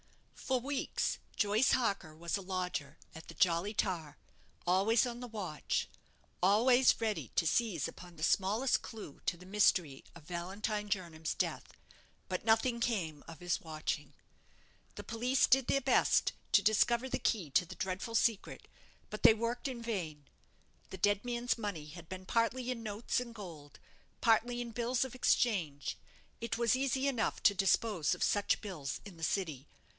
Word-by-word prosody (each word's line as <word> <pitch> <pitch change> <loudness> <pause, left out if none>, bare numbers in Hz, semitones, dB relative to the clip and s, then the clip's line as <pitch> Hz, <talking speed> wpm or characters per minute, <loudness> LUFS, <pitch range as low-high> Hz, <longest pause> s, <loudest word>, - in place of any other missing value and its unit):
For 260 -1 -1
weeks 275 +2 -2 0.2
Joyce 210 +4 +3
Harker 200 -10 0
was 170 +2 -3
a 200 - -3
lodger 180 -6 -3 0.2
at 160 - -11
the - - -8
'Jolly 185 +1 +2
Tar'; 170 -8 -2 0.5
always 200 +7 +4
on 240 0 -5
the 245 - -5
watch; 200 -9 -2 0.6
always 245 +7 +5
ready 220 -3 -2
to 165 - +2
seize 200 - +1
upon 175 -1 -11
the 155 - -7
smallest 210 +10 +2
clue 215 -11 -9
to 175 - +1
the 180 - -14
mystery 185 -8 +2
of 170 - -13
Valentine 200 +5 -3
Jernam's 170 -5 -3
death; - - -3 0.5
but - - -3
nothing 235 +2 +2
came 175 -11 -1
of 165 -2 -10
his 175 -1 -1
watching. 155 -1 -4 0.8
The - - -7
police 250 +3 +2
did 265 -1 +4
their 275 - +3
best 270 0 +3 0.2
to - - +5
discover 235 +3 +3
the - - -2
key 190 - 0
to 180 - +3
the 185 +2 -9
dreadful 190 +5 -3
secret; 225 -2 0 0.4
but 215 - -7
they 220 - +9
worked 235 +3 -2
in 250 -3 -5
vain. 165 -11 -4 0.6
The 190 - -7
dead 205 +2 +2
man's 245 0 -1
money 205 -9 -4
had 165 +1 -11
been 185 0 -7
partly 240 +4 0
in 230 -2 -5
notes 215 +3 -1
and 240 -2 -6
gold, 160 -9 -10 0.4
partly 235 +2 +3
in 240 -1 -4
bills 245 +3 0
of 255 - -8
exchange. 175 - +1 0.4
It 230 0 -2
was 235 +1 +3
easy 270 +1 0
enough 245 -5 0
to 200 - +6
dispose 195 -2 +2
of - - -2
such 205 -1 +2
bills 155 - -5
in 200 -4 -10
the 165 - -11
City. 155 -5 -2
205 Hz, 165 wpm, -33 LUFS, 175-235 Hz, 0.8 s, they